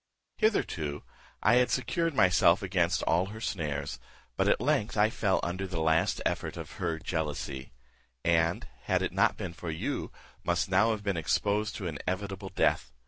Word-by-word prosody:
"Hitherto 80 - 0 0.4
I 115 +4 +5
had 125 0 +4
secured 165 +5 0
myself 90 -1 +5
against 90 -1 +1
all 85 +3 +2
her 110 +2 -8
snares, 75 -9 -3 0.4
but - - +1
at - - +3
length 105 +1 0
I 105 +1 +4
fell 100 -5 +1
under 95 +2 -2
the 90 -3 -4
last 80 +1 +2
effort - - -2
of - - -7
her 85 -3 0
jealousy; 75 -5 -4 0.5
and, 85 0 +2 0.2
had - - +1
it - - -1
not - - +3
been 85 - -5
for 85 0 -6
you, 80 - -3 0.3
must 85 +2 0
now 105 +5 +4
have 110 -2 -1
been 100 -3 -1
exposed 105 +6 0
to 100 - -5
inevitable 95 +4 -4
death. 95 - +1
90 Hz, 165 wpm, -29 LUFS, 80-105 Hz, 0.5 s, I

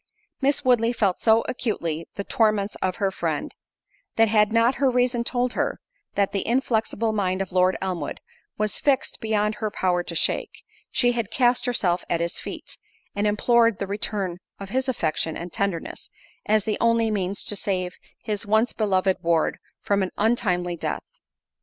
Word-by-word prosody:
Miss 275 0 +1
Woodley 240 -2 +3
felt 200 -6 0
so 225 0 +5
acutely 170 -10 -2
the 200 - -3
torments 215 -2 +1
of 185 -1 0
her 200 -3 0
friend, - - -3 0.6
that 225 -1 +4
had 210 -1 +4
not 230 +2 +4
her 270 - +5
reason 245 -1 +1
told 245 +1 -1
her, - - -1 0.4
that 200 -1 +2
the 195 -1 -2
inflexible 225 -2 +1
mind 185 -3 0
of 195 -1 -3
Lord 185 0 +3
Elmwood, 185 -2 -3 0.4
was 215 0 -1
fixed 275 -2 +1
beyond 215 -1 0
her 215 - 0
power 180 -3 0
to 170 - -5
shake, - - 0 0.3
she 245 -1 +3
had 230 -4 -2
cast 245 0 +2
herself 180 -7 +1
at 170 - +1
his 170 +1 -1
feet, - - -7 0.4
and 205 +1 +1
implored 230 +1 +3
the 200 - -2
return 195 -2 -2 0.2
of 195 -1 -7
his 260 +4 0
affection 160 -8 -1
and 175 0 -7
tenderness, 200 -4 -3 0.4
as 215 -1 +3
the 215 0 -2
only 230 -1 +3
means 195 -1 -1
to 205 - -1
save 185 -2 -1 0.3
his 210 -1 -2
once 220 +3 +2
beloved 190 -3 +1
ward 165 -1 +1 0.2
from 200 -1 +1
an 190 - 0
untimely 185 -6 +1
death. - - -3
210 Hz, 170 wpm, -24 LUFS, 185-230 Hz, 0.6 s, so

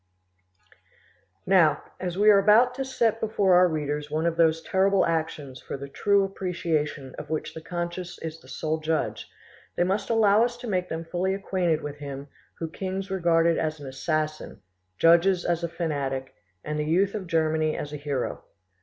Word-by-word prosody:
Now, 170 -6 +4 0.2
as 180 -1 -4
we 210 +1 +6
are 200 - +6
about 220 +5 +5
to 270 +1 -3
set 235 -4 0
before 205 -4 +2
our 180 +1 +6
readers 150 -2 -3
one 155 +2 -1
of 170 -1 +1
those 165 -1 +3
terrible 195 0 +2
actions 155 -5 -3
for - - -6
the 140 +1 -7
true 200 +8 +2
appreciation 165 -7 -2
of - - -8
which 155 -1 -3
the 160 - -8
conscience 175 +1 -5
is 160 0 -6
the 130 - -19
sole 155 +4 -2
judge, 155 0 -2 0.5
they - - +2
must 190 +3 -1
allow 220 -1 +4
us 240 0 -1
to 245 - -8
make 180 -3 -1
them 165 +1 -4
fully 185 +3 -1
acquainted 180 -5 -1
with 145 0 -6
him 140 -1 -7 0.3
whom 165 -1 -5
kings 190 +1 -4
regarded 170 -3 +2
as 155 -1 -2
an 145 - -9
assassin, 155 - -3 0.3
judges 170 - +4
as 170 -1 0
a 170 - -1
fanatic, 140 -6 -3 0.3
and 150 0 -3
the 150 - -1
youth 185 +5 +2
of 200 -4 -5
Germany 160 -2 +1
as 145 0 -5
a - - -3
hero. 145 -3 -3
165 Hz, 180 wpm, -26 LUFS, 155-190 Hz, 0.5 s, we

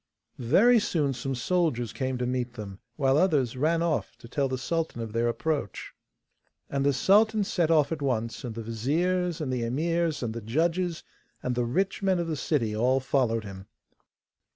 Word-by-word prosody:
Very 225 - +5
soon 150 -9 0
some 130 +2 -3
soldiers 125 - 0
came 130 +2 -2
to 125 - -2
meet 125 -1 -2
them, 100 -4 -8 0.2
while 135 +1 +3
others 145 -10 +2
ran 165 +5 +1
off 165 -3 -1
to - - -13
tell 140 +3 0
the 130 0 -2
sultan 165 0 -2
of 115 -2 -5
their 115 +1 +1
approach. 140 -3 -2 0.8
And 140 -1 0
the 140 - +4
sultan 210 +8 +4
set 175 -4 0
off 155 -3 +3
at 160 -3 -3
once, 115 -4 -2
and 120 -3 -5
the 115 - -5
viziers 165 +10 0
and 140 -5 -2
the 125 - -1
emirs, 160 +4 0
and 110 -2 -2
the 115 - -5
judges, 165 - 0 0.4
and 125 - -1
the 120 0 0
rich 185 +13 -1
men 190 -2 +2
of 170 - -1
the 160 -1 -2
city, 125 -6 0
all 125 +4 +2
followed 125 -4 0
him. 95 -1 -9
135 Hz, 185 wpm, -27 LUFS, 120-165 Hz, 0.8 s, Very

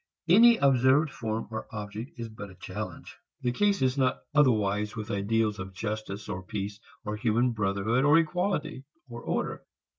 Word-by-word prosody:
Any 230 +7 +7
observed 135 - +4
form 110 -2 -3
or 110 - -5
object 105 +3 -6
is 115 -1 -5
but 105 -2 -9
a 95 - -14
challenge. - - -7 0.2
The 125 - +1
case 200 +5 +2
is 130 +1 +1
not 130 -1 +2 0.2
otherwise 105 -7 +2
with 110 +1 -5
ideals 105 +1 0
of 95 0 -7
justice 110 0 -4
or 95 - -4
peace 100 +1 -5 0.3
or 105 0 -3
human 120 +2 +2
brotherhood, 105 +3 0
or 145 +3 +6
equality, 165 -4 -1 0.2
or 120 -1 -8
order. - - -2
115 Hz, 160 wpm, -28 LUFS, 105-135 Hz, 0.3 s, Any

